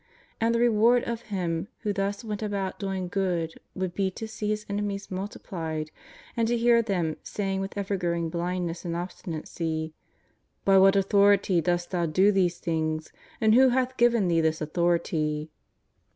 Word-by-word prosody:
And 230 Hz, +1 st, +2 dB
the -, -, +2 dB
reward 235 Hz, +1 st, +4 dB
of 235 Hz, -1 st, -3 dB
Him 175 Hz, -3 st, -2 dB
who 210 Hz, -2 st, -1 dB
thus 200 Hz, +2 st, -2 dB
went 210 Hz, -2 st, -4 dB
about 200 Hz, -3 st, -3 dB
doing 190 Hz, -2 st, -3 dB
good 175 Hz, -4 st, -1 dB, 0.2 s
would 185 Hz, -2 st, -2 dB
be 195 Hz, 0 st, 0 dB
to 220 Hz, +4 st, -7 dB
see 215 Hz, -1 st, -5 dB
His 215 Hz, 0 st, -2 dB
enemies 200 Hz, -1 st, -3 dB
multiplied 165 Hz, -5 st, -4 dB, 0.4 s
and 230 Hz, -2 st, +1 dB
to 240 Hz, +1 st, +1 dB
hear 235 Hz, 0 st, +4 dB
them 180 Hz, -8 st, -1 dB
saying 195 Hz, -2 st, -2 dB
with 195 Hz, +1 st, -5 dB
evergrowing 175 Hz, -4 st, -1 dB
blindness 175 Hz, 0 st, -2 dB
and 170 Hz, -2 st, -3 dB
obstinacy: 160 Hz, -2 st, -4 dB, 0.4 s
" -, -, -44 dB
By 195 Hz, -1 st, +6 dB
what 195 Hz, +1 st, +6 dB
authority 200 Hz, -2 st, +4 dB
dost 175 Hz, +1 st, -1 dB
Thou 175 Hz, -2 st, 0 dB
do 185 Hz, +6 st, +4 dB
these 180 Hz, -3 st, +1 dB
things? 155 Hz, -2 st, -2 dB, 0.3 s
and 220 Hz, -1 st, +4 dB
who 260 Hz, +2 st, +7 dB
hath 255 Hz, +1 st, 0 dB
given 235 Hz, -5 st, +3 dB
Thee 165 Hz, -1 st, +3 dB
this 160 Hz, 0 st, +1 dB
authority 155 Hz, -2 st, 0 dB
190 Hz, 165 wpm, -27 LUFS, 170-210 Hz, 0.4 s, who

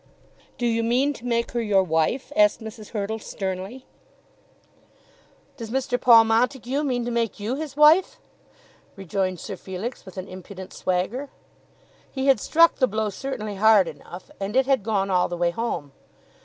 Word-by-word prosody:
"Do 245 Hz, -, -2 dB
you 230 Hz, -1 st, +1 dB
mean 250 Hz, +5 st, +1 dB
to 245 Hz, -2 st, -9 dB
make 235 Hz, -1 st, 0 dB
her 240 Hz, -, -1 dB
your 200 Hz, -4 st, +3 dB
wife?" 165 Hz, -, -1 dB
asked 315 Hz, 0 st, +4 dB
Mrs. 220 Hz, -1 st, -10 dB
Hurtle 220 Hz, 0 st, -3 dB
sternly. 195 Hz, +5 st, -5 dB, 1.7 s
"Does 230 Hz, -4 st, -7 dB
Mr. 255 Hz, 0 st, -1 dB
Paul 230 Hz, -2 st, +8 dB
Montague 250 Hz, +4 st, 0 dB
mean 250 Hz, -5 st, -1 dB
to 240 Hz, -, -3 dB
make 230 Hz, -3 st, -1 dB
you 210 Hz, +4 st, -2 dB
his 290 Hz, 0 st, -6 dB
wife?" 345 Hz, +11 st, +5 dB, 0.8 s
rejoined 190 Hz, -1 st, -2 dB
Sir 200 Hz, -, -6 dB
Felix 190 Hz, +7 st, -6 dB
with 190 Hz, -1 st, -13 dB
an 185 Hz, +1 st, -5 dB
impudent 185 Hz, +1 st, -10 dB
swagger. 195 Hz, +10 st, -2 dB, 0.8 s
He 265 Hz, -1 st, -3 dB
had 270 Hz, -4 st, +4 dB
struck 335 Hz, +9 st, +4 dB
the 255 Hz, -, +3 dB
blow 215 Hz, -1 st, -2 dB
certainly 215 Hz, -2 st, -5 dB
hard 210 Hz, -3 st, +5 dB
enough, 165 Hz, +3 st, -10 dB
and 200 Hz, +3 st, -4 dB
it 265 Hz, 0 st, +4 dB
had 270 Hz, -3 st, +2 dB
gone 195 Hz, -2 st, -1 dB
all 180 Hz, -1 st, +2 dB
the 175 Hz, -, -5 dB
way 170 Hz, 0 st, +1 dB
home. 170 Hz, -9 st, -4 dB
225 Hz, 165 wpm, -24 LUFS, 195-255 Hz, 1.7 s, Paul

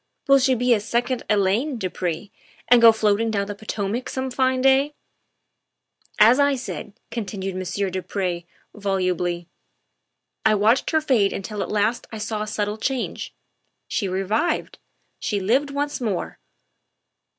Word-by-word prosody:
Will 275 Hz, 0 st, +6 dB
she 260 Hz, 0 st, +3 dB
be 245 Hz, +1 st, +3 dB
a 220 Hz, -, +2 dB
second 240 Hz, +4 st, -1 dB
Elaine, 215 Hz, +7 st, +1 dB
du 190 Hz, -, -2 dB
Pre, 180 Hz, +2 st, -4 dB, 0.4 s
and 240 Hz, 0 st, +6 dB
go 230 Hz, -1 st, +10 dB
floating 220 Hz, 0 st, +1 dB
down 200 Hz, -2 st, 0 dB
the 205 Hz, -, -5 dB
Potomac 210 Hz, +3 st, -3 dB
some 260 Hz, 0 st, -3 dB
fine 260 Hz, 0 st, +1 dB
day? 270 Hz, +3 st, +3 dB, 0.3 s
' -, -, -53 dB
' -, -, -25 dB
"As 250 Hz, +4 st, +4 dB
I 285 Hz, -1 st, +4 dB
said," 245 Hz, -5 st, -6 dB, 0.2 s
continued 195 Hz, -4 st, -4 dB
Monsieur 185 Hz, +1 st, -2 dB
du 185 Hz, +1 st, -2 dB
Pre 175 Hz, -3 st, -3 dB, 0.3 s
volubly, 180 Hz, -3 st, -1 dB, 0.5 s
" -, -, -56 dB
I -, -, +4 dB
watched 220 Hz, +5 st, +3 dB
her 315 Hz, -1 st, +2 dB
fade 240 Hz, -10 st, +2 dB
until 205 Hz, +1 st, -4 dB
at -, -, -3 dB
last 215 Hz, +3 st, 0 dB
I 220 Hz, -, -6 dB
saw 215 Hz, 0 st, -3 dB
a 215 Hz, -, -3 dB
subtle 210 Hz, 0 st, -2 dB
change. 260 Hz, +2 st, -3 dB, 0.5 s
She 200 Hz, -, -1 dB
revived. 195 Hz, -, -1 dB, 0.4 s
She 205 Hz, -, -1 dB
lived 250 Hz, +9 st, +1 dB
once 285 Hz, 0 st, -2 dB
more. 210 Hz, -7 st, -3 dB
215 Hz, 160 wpm, -23 LUFS, 195-255 Hz, 0.5 s, go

